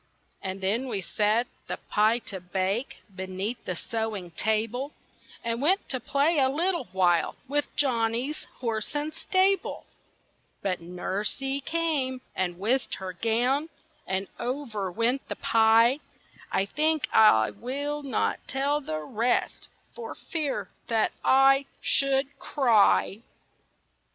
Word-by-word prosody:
And 190 0 -4
then 220 +8 0
we 215 -5 -2
set 215 +6 +1 0.2
the - - -3
pie 215 +2 +2
to 190 - -5
bake, 185 +3 -2
Beneath 190 +5 -4
the 185 - -2
sewing 215 -3 -3
table; 220 - -1 0.5
And 230 +1 -2
went 370 +7 +2
to 260 - -1
play 285 +6 +2
a 265 -1 +4
little 340 +5 0
while 180 -2 +2
With 290 +2 -1
Johnny's 245 +1 0 0.2
horse 225 +2 -2
and 295 +1 -1
stable. 380 +3 +1 0.8
But 185 -2 0
Nursie 205 +10 -2
came, 295 -6 -1
and 180 -2 -1
whisked 235 +8 0
her 190 -1 -6
gown, 245 - +1 0.4
And 190 +1 -1
over 235 -7 -3
went 235 +7 0
the - - -4
pie. 230 +3 +4 0.5
I 195 - +2
think 305 +4 +1
I 110 - +6
will 285 +4 -3
not 270 -5 0
tell 280 +2 0
the 155 - -4
rest, 230 +10 -1 0.3
For 465 -1 -7
fear—that—I 270 - +1
should—cry! 270 -6 +2
235 Hz, 115 wpm, -27 LUFS, 200-280 Hz, 0.8 s, I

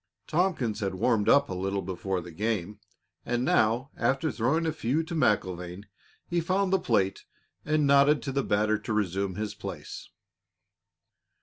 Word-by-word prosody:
Tompkins 155 - 0
had 95 -2 -2
warmed 110 +1 +2
up 140 0 +5
a - - -5
little 95 +1 -2
before 95 0 -3
the 85 0 -10
game, 105 +2 -2 0.4
and 120 +1 -1
now, 120 +6 +2
after 135 +3 0
throwing 140 +9 0
a 160 - +1
few 155 +2 0
to 160 - -7
MacIlvaine, 95 - 0 0.4
he 175 0 -1
found 190 +3 0
the 190 - +4
plate 100 - 0 0.4
and 150 0 +2
nodded 140 +1 +5
to 140 - -3
the 140 0 0
batter 105 +1 +1
to 110 +1 -4
resume 100 -2 -1
his 105 0 -3
place. - - -8
110 Hz, 160 wpm, -28 LUFS, 95-145 Hz, 0.4 s, up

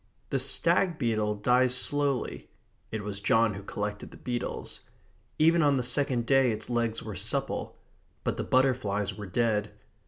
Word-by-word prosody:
The 135 - +1
stag 170 +6 +2
beetle 110 -5 0
dies 125 +4 +3
slowly 145 0 -1 0.4
(it 110 -1 -4
was 100 -1 -3
John 115 +1 +3
who 100 - -7
collected 105 +1 -5
the - - -13
beetles). 120 -1 -4 0.6
Even 165 +2 +4
on 145 -3 +3
the 125 - 0
second 125 -1 +1
day 135 -1 +4
its 110 +2 -5
legs 115 -2 -1
were - - -6
supple. - - -2 0.5
But - - -1
the - - -3
butterflies 110 -7 +1
were 105 0 -7
dead. 105 0 0
120 Hz, 155 wpm, -28 LUFS, 105-135 Hz, 0.6 s, Even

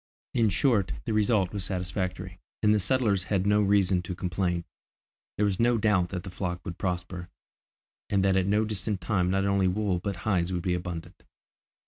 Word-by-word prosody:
In 115 -3 +3
short, 105 -1 +2
the 110 - -1
result 105 -3 +2
was 100 -2 -3
satisfactory, 95 0 -3 0.2
and 105 0 +5
the 105 - +3
settlers 105 -3 +1
had 95 0 0
no 105 +1 +4
reason 100 -2 +3
to 90 +1 -5
complain. 90 -1 -1 0.7
There 105 - +2
was 100 -2 0
no 120 0 +3
doubt 100 -5 +2
that 90 -2 -4
the 95 - -7
flock 90 -1 -4
would 90 -2 -6
prosper, 90 -1 -3 0.8
and 100 -1 +2
that 95 -1 +3
at 95 0 +2
no 105 +2 +2
distant 105 -1 -2
time 90 -4 0
not 95 +1 +1
only 100 -1 +2
wool 95 -1 0
but 100 +2 -3
hides 95 -4 +1
would 90 -2 -2
be 90 -2 +1
abundant. 90 -2 -5
95 Hz, 185 wpm, -28 LUFS, 90-105 Hz, 0.8 s, and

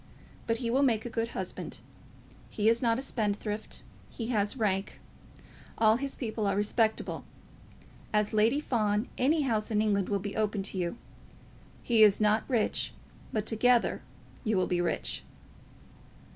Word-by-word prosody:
But 230 0 +1
he 230 -1 -2
will 265 +3 +3
make 230 -5 +2
a 240 - -5
good 230 0 -1
husband. - - -4 0.7
He 210 0 0
is 230 +1 +4
not 230 -2 +2
a 265 - -2
spendthrift. 210 -3 -3 0.3
He 230 -1 -5
has 210 0 0
rank. 195 -4 -1 0.8
All 220 0 +5
his 275 +1 -4
people 220 -4 -2
are 195 - +1
respectable. 215 +2 0 0.9
As 210 0 +1
Lady 225 +6 +3
Fawn, 215 -5 0
any 295 +4 +3
house 220 -5 0
in 215 -2 +1
England 205 -3 +1
will 200 - +1
be 200 +1 -5
open 210 -2 0
to 195 - -5
you. 175 +5 -2 0.9
He 230 -3 +3
is 210 -2 +7
not 215 +1 +3
rich, 235 -5 0 0.4
but 215 -2 -1
together 240 +2 +2 0.4
you 215 -4 +1
will 185 - +2
be 175 -1 0
rich." 175 - -2
220 Hz, 155 wpm, -29 LUFS, 210-235 Hz, 0.9 s, is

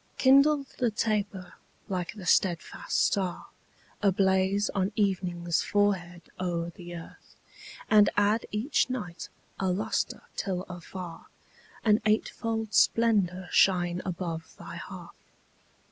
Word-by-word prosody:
Kindle 275 +2 +5
the 245 - +3
taper 205 -4 -2 0.3
like 180 -4 -3
the 195 -4 -9
steadfast 175 0 +1
star 190 -3 -1 0.5
Ablaze 195 0 +2
on 195 0 0
evening's 180 -4 0
forehead 180 -4 0 0.2
o'er 170 -2 -2
the 175 0 -9
earth, 165 - -12 0.5
And 210 -1 +6
add 210 +2 +2
each 225 +6 +1
night 180 -10 -5 0.3
a 190 - 0
lustre 185 +4 -1
till 185 -2 -2
afar 180 -1 -9 0.6
An 215 0 +4
eightfold 220 0 -1
splendor 195 -6 +3
shine 180 -2 +3
above 170 -3 -5
thy - - -9
hearth. - - -11
190 Hz, 110 wpm, -28 LUFS, 175-210 Hz, 0.6 s, And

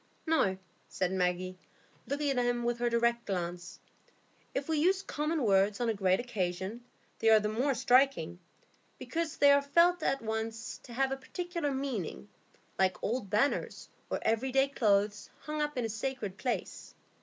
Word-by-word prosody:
"No," 260 -13 +2 0.3
said 185 -1 -1
Maggie, 185 0 -1 0.5
looking 285 +2 0
at 270 - -2
him 240 0 0
with 240 0 -1
her 240 0 +1
direct 235 0 +1
glance; 180 -2 -4 0.8
"if 275 - -2
we 320 -2 +1
use 375 +5 +2
common 305 -2 -1
words 200 -1 +3
on 240 -1 +1
a - - +2
great 190 -2 +2
occasion, 200 -1 -3 0.4
they 225 - +3
are 220 -1 +7
the 210 0 -1
more 255 +5 0
striking, 250 - +3 0.6
because 330 -2 -3
they 285 0 +6
are 280 0 +5
felt 340 +5 +3
at 275 -5 0
once 225 +1 -4
to 240 - -10
have 265 +2 +1
a 270 - -1
particular 340 +3 -4
meaning, 240 - -4 0.5
like 190 -1 +1
old 225 -2 -2
banners, 215 +8 0 0.2
or - - 0
everyday 265 +4 +2
clothes, 205 -5 +1
hung 305 0 -3
up 295 -2 -2
in 245 - 0
a - - -2
sacred 220 -3 -4
place." 245 +3 -4
235 Hz, 165 wpm, -31 LUFS, 200-275 Hz, 0.8 s, are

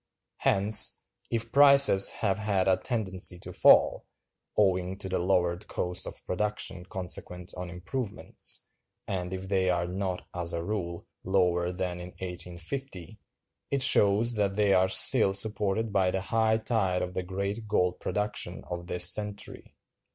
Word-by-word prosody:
Hence, 100 +2 +2 0.3
if 115 -1 -3
prices 140 -8 +6
have 100 -1 -1
had 100 -3 0
a 95 - +4
tendency 95 -6 +1
to - - -8
fall, - - +4 0.5
owing 95 -2 +1
to 95 - -6
the 95 - -2
lowered 90 -1 0
cost 90 0 -2
of - - -10
production 95 -2 -3
consequent 90 0 -5
on 90 -1 -6
improvements—and 95 -2 -3
if 95 0 -6
they 95 -1 +1
are 85 -1 0
not, 90 0 -4
as 90 -1 -1
a 85 0 -3
rule, 85 -3 -4 0.2
lower 90 -2 +1
than 90 -1 -4
in 90 +1 -9
1850—it 90 - -7
shows 115 -2 +4
that 100 -3 -1
they 105 -1 +2
are 95 0 +3
still 95 +1 +4
supported 105 +1 0
by 95 -2 +2
the 95 +1 -2
high 110 +2 +1
tide 105 -5 -1
of 90 - -5
the 95 - -2
great 100 +4 -4
gold 90 -4 0
production 105 0 -3
of 85 0 -5
this 90 - +5
century. 105 -1 -4
95 Hz, 145 wpm, -28 LUFS, 90-105 Hz, 0.5 s, prices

